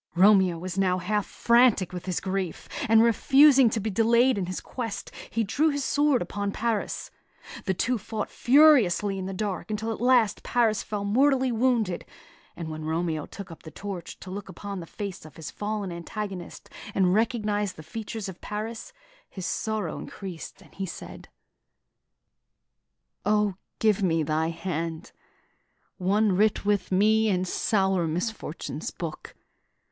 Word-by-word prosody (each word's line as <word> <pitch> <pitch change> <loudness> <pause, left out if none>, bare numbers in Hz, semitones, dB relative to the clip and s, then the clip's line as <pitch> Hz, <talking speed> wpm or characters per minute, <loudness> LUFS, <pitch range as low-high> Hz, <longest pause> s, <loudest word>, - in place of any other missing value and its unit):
Romeo 190 -2 +5
was 185 +2 -4
now 185 -1 +2
half 205 +3 -1
frantic 235 -6 +3
with 180 +1 -6
his 180 - 0
grief; 190 -3 -3 0.2
and 225 0 +7
refusing 270 +3 +6
to 220 - -1
be 215 +1 -2
delayed 235 +5 +4
in 190 -3 -2
his 185 - -3
quest, 230 -5 -5 0.2
he 230 - 0
drew 280 +10 +2
his 285 -1 -1
sword 290 -3 +2
upon 200 0 -3
Paris. 225 0 -2 0.5
The 190 - 0
two 245 +5 0
fought 215 +1 -4
furiously 240 - +5
in 185 - -4
the - - -4
dark, 200 0 -3
until 215 +1 -2
at 220 - -8
last 245 -4 +3
Paris 225 -3 +1
fell 205 -1 -4
mortally 260 +4 +3
wounded; 230 -6 +1 0.5
and 170 - -6
when 155 0 -6
Romeo 160 -1 -1
took 200 -4 -9
up 165 - -11
the 160 - -10
torch 190 0 -7
to 185 - -8
look 195 0 -6
upon 200 +2 -6
the 165 - -8
face 200 -1 -6
of 155 -3 -13
his 160 - -7
fallen 205 -2 -3
antagonist, 180 +1 -6 0.3
and 185 -2 +3
recognised 210 -2 0
the 155 - -10
features 220 +4 -6
of 190 -2 -9
Paris, 220 +2 -5 0.4
his 185 -3 -7
sorrow 215 -2 -2
was - - -6
increased, 185 -5 -8
and - - -20
he 190 0 -4
said: - - -9 1.9
"O, 210 -1 +2 0.2
give 215 -2 +2
me 165 -4 +2
thy 155 +2 0
hand, 165 -1 -4 0.9
One 200 +2 +2
writ 210 +1 +2
with 205 -3 +1
me 215 +3 +4
in 185 -2 +1
sour 190 -2 +1
misfortune's 180 +8 -4
book! - - -7
205 Hz, 155 wpm, -26 LUFS, 185-225 Hz, 1.9 s, and